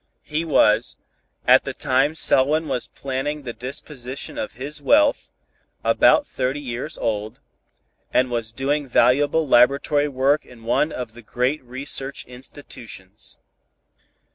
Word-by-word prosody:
He 155 Hz, +2 st, -2 dB
was, 115 Hz, -8 st, +3 dB, 0.5 s
at -, -, +7 dB
the -, -, -5 dB
time 135 Hz, +4 st, +1 dB
Selwyn 155 Hz, +2 st, +3 dB
was 125 Hz, -, -2 dB
planning 140 Hz, +2 st, -4 dB
the 120 Hz, -3 st, -5 dB
disposition 130 Hz, 0 st, -6 dB
of -, -, -4 dB
his 145 Hz, +6 st, -6 dB
wealth, 290 Hz, -, +3 dB, 0.5 s
about 290 Hz, -, +4 dB
thirty 130 Hz, -, -2 dB
years 125 Hz, -3 st, -5 dB
old, 105 Hz, -1 st, -3 dB, 0.7 s
and 125 Hz, 0 st, +2 dB
was 115 Hz, -2 st, -2 dB
doing 140 Hz, +4 st, -1 dB
valuable 145 Hz, +6 st, +3 dB
laboratory 140 Hz, +4 st, +4 dB
work 140 Hz, +2 st, +1 dB
in 120 Hz, -2 st, -16 dB
one 135 Hz, +7 st, +1 dB
of 125 Hz, -3 st, -6 dB
the 120 Hz, -, -12 dB
great 125 Hz, +6 st, -1 dB
research 135 Hz, +2 st, -4 dB
institutions. 125 Hz, -6 st, -9 dB
130 Hz, 125 wpm, -22 LUFS, 120-145 Hz, 0.7 s, at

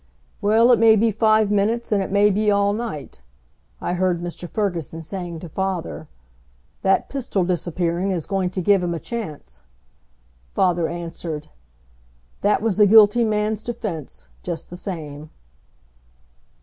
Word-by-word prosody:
"Well, 225 Hz, +4 st, +4 dB
it 240 Hz, -, +5 dB
may 225 Hz, -1 st, +7 dB
be 225 Hz, +1 st, +3 dB
five 215 Hz, 0 st, +3 dB
minutes, 220 Hz, +4 st, 0 dB
and 205 Hz, -2 st, +3 dB
it 190 Hz, -, -3 dB
may 205 Hz, +1 st, +4 dB
be 210 Hz, +2 st, +1 dB
all 200 Hz, 0 st, +3 dB
night," 210 Hz, -, -6 dB, 0.6 s
I -, -, -2 dB
heard 180 Hz, -1 st, +1 dB
Mr. 175 Hz, 0 st, -7 dB
Ferguson 170 Hz, -6 st, -3 dB
saying 175 Hz, -2 st, -6 dB
to 175 Hz, -, -7 dB
father. 185 Hz, -3 st, -3 dB, 0.7 s
"That 195 Hz, 0 st, +2 dB
pistol 250 Hz, -8 st, -2 dB
disappearing 175 Hz, +1 st, -1 dB
is 175 Hz, -5 st, -2 dB
going 190 Hz, -2 st, -1 dB
to 185 Hz, 0 st, -4 dB
give 200 Hz, +1 st, +4 dB
him 175 Hz, -1 st, -1 dB
a -, -, -4 dB
chance." 150 Hz, -, -7 dB, 0.9 s
Father 175 Hz, -3 st, +2 dB
answered, 165 Hz, -2 st, -6 dB, 0.9 s
"That 210 Hz, +1 st, +2 dB
was 220 Hz, -2 st, 0 dB
a 210 Hz, -, +7 dB
guilty 220 Hz, +2 st, +6 dB
man's 215 Hz, -1 st, 0 dB
defense, 210 Hz, -, -6 dB
just 170 Hz, -2 st, -6 dB
the -, -, -6 dB
same." 155 Hz, -5 st, -7 dB
195 Hz, 145 wpm, -22 LUFS, 170-215 Hz, 0.9 s, may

